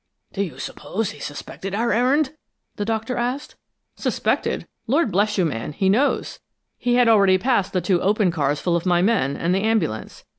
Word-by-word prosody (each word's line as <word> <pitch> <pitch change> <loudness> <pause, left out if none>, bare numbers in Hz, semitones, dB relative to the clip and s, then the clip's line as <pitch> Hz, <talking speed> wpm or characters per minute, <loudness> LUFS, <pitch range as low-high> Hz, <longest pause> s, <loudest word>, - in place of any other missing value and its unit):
"Do 200 - -2
you 190 -5 -4
suppose 220 +1 -4
he 145 - -13
suspected 185 +7 -6
our 235 +1 +1
errand?" 265 +5 +2 0.4
the 205 - -3
Doctor 225 +3 -2
asked. 250 +4 -3 0.4
"Suspected? - - -1 0.2
Lord 275 -1 +2
bless 210 +3 +1
you, 185 - +3
man, 140 -1 -3
he 190 +5 +1
knows! 250 +9 +1 0.4
He 245 0 +1
had 245 -1 +4
already 200 -4 +5
passed 220 -2 +1
the 185 - 0
two 180 -2 +1
open 205 -2 +2
cars 145 -2 0
full 175 -1 0
of 170 +2 -1
my 175 -1 +3
men, 195 - +1
and 170 +2 0
the 190 - +1
ambulance. 200 - -1
200 Hz, 185 wpm, -22 LUFS, 175-235 Hz, 0.4 s, already